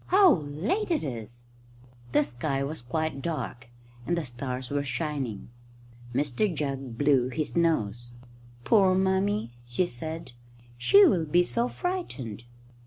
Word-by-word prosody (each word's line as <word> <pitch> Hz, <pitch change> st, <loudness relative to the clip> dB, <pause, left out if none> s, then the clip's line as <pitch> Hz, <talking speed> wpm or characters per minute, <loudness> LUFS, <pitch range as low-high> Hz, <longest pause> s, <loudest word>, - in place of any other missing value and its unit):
"How 380 Hz, -3 st, +7 dB
late 165 Hz, -, -2 dB
it 330 Hz, -, +1 dB
is!" 120 Hz, -3 st, -6 dB, 0.7 s
The 150 Hz, -, +4 dB
sky 135 Hz, +2 st, -2 dB
was 150 Hz, +1 st, -3 dB
quite 140 Hz, +3 st, -2 dB
dark, 130 Hz, -6 st, -4 dB, 0.4 s
and 175 Hz, -, +1 dB
the 165 Hz, -, -2 dB
stars 125 Hz, +1 st, -5 dB
were 145 Hz, 0 st, 0 dB
shining. 135 Hz, -6 st, -3 dB, 0.6 s
Mr 145 Hz, -, 0 dB
Jugg 135 Hz, -6 st, -4 dB
blew 135 Hz, -3 st, +3 dB
his 155 Hz, +3 st, -3 dB
nose. 120 Hz, -9 st, +1 dB, 0.5 s
"Poor 190 Hz, -, +5 dB
Mummy!" 190 Hz, -, +1 dB
she 120 Hz, +9 st, 0 dB
said; 160 Hz, 0 st, -6 dB, 0.4 s
"she 395 Hz, -, +7 dB
will 180 Hz, -, +3 dB
be 175 Hz, +4 st, +4 dB
so 235 Hz, +7 st, 0 dB
frightened." 150 Hz, -, -4 dB
145 Hz, 130 wpm, -28 LUFS, 125-180 Hz, 0.7 s, How